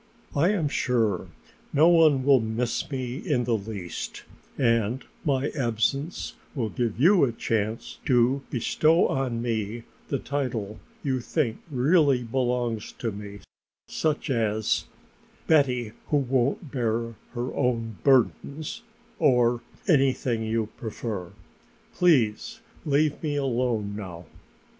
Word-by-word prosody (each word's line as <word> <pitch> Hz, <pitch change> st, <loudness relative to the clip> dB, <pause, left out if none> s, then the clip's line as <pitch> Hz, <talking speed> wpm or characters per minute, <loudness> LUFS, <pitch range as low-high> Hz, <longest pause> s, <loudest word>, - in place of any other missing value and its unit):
"I 155 Hz, +6 st, +4 dB
am 190 Hz, -7 st, +1 dB
sure 115 Hz, -9 st, 0 dB, 0.4 s
no 155 Hz, +3 st, +5 dB
one 160 Hz, -6 st, +5 dB
will 135 Hz, -1 st, +6 dB
miss 115 Hz, +2 st, -2 dB
me 130 Hz, -3 st, -3 dB
in 145 Hz, -9 st, 0 dB
the 120 Hz, -1 st, +1 dB
least 100 Hz, -4 st, -6 dB, 0.3 s
and 115 Hz, 0 st, +1 dB, 0.2 s
my 140 Hz, -1 st, +1 dB
absence 135 Hz, -, -1 dB, 0.2 s
will 115 Hz, -6 st, -1 dB
give 115 Hz, -1 st, -2 dB
you 175 Hz, +5 st, +6 dB
a 130 Hz, -, +3 dB
chance 110 Hz, -1 st, -2 dB
to 130 Hz, +1 st, +3 dB
bestow 155 Hz, +7 st, +3 dB
on 125 Hz, -3 st, -1 dB
me 115 Hz, -1 st, -2 dB, 0.2 s
the 140 Hz, -, 0 dB
title 120 Hz, -8 st, -3 dB, 0.2 s
you 130 Hz, -3 st, 0 dB
think 120 Hz, -2 st, -1 dB
really 140 Hz, -1 st, +3 dB
belongs 120 Hz, -2 st, -1 dB
to 115 Hz, -, -3 dB
me, 100 Hz, 0 st, -8 dB, 0.5 s
such 155 Hz, -2 st, -1 dB
as: 110 Hz, -3 st, +1 dB, 0.6 s
'Betty 125 Hz, -7 st, +2 dB, 0.2 s
who 150 Hz, -, +2 dB
won't 135 Hz, +2 st, 0 dB
bear 115 Hz, -2 st, -1 dB, 0.2 s
her 120 Hz, 0 st, -3 dB
own 115 Hz, -4 st, -1 dB
burdens' 140 Hz, -, +1 dB, 0.4 s
or 125 Hz, -5 st, +3 dB, 0.3 s
anything 135 Hz, -, +2 dB
you 110 Hz, -1 st, -1 dB
prefer. 110 Hz, -5 st, -5 dB, 0.6 s
Please 165 Hz, -, +2 dB, 0.3 s
leave 145 Hz, +1 st, +2 dB
me 150 Hz, -2 st, -1 dB
alone 120 Hz, -6 st, 0 dB
now." 90 Hz, -5 st, -7 dB
125 Hz, 120 wpm, -26 LUFS, 115-140 Hz, 0.6 s, will